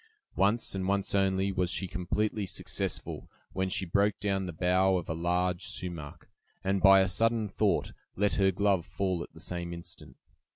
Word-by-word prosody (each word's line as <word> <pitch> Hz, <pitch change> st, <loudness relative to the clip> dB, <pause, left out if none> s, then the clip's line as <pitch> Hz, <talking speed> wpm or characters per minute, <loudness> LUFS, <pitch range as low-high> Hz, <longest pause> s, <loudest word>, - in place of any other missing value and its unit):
Once, 105 Hz, +4 st, +2 dB
and 95 Hz, -1 st, -2 dB
once 100 Hz, 0 st, +1 dB
only, 95 Hz, 0 st, +2 dB
was 90 Hz, -2 st, 0 dB
she 95 Hz, +1 st, -1 dB
completely 105 Hz, +2 st, -1 dB
successful; -, -, -4 dB, 0.2 s
when 95 Hz, 0 st, -1 dB
she 95 Hz, -, -1 dB
broke 100 Hz, +4 st, +1 dB
down 95 Hz, -2 st, -1 dB
the -, -, -4 dB
bough 90 Hz, +3 st, +2 dB
of 90 Hz, -, -5 dB
a -, -, -2 dB
large 90 Hz, +2 st, 0 dB
sumach, 85 Hz, -6 st, -5 dB, 0.4 s
and 95 Hz, 0 st, 0 dB
by 95 Hz, +1 st, +8 dB
a 95 Hz, -, +2 dB
sudden 115 Hz, +3 st, +2 dB
thought, 95 Hz, -, 0 dB, 0.2 s
let 105 Hz, +1 st, +1 dB
her 95 Hz, -1 st, +3 dB
glove 95 Hz, -1 st, +2 dB
fall 95 Hz, 0 st, -2 dB
at -, -, -8 dB
the 80 Hz, -, -13 dB
same 85 Hz, 0 st, -4 dB
instant. 85 Hz, 0 st, -9 dB
95 Hz, 175 wpm, -30 LUFS, 90-100 Hz, 0.4 s, by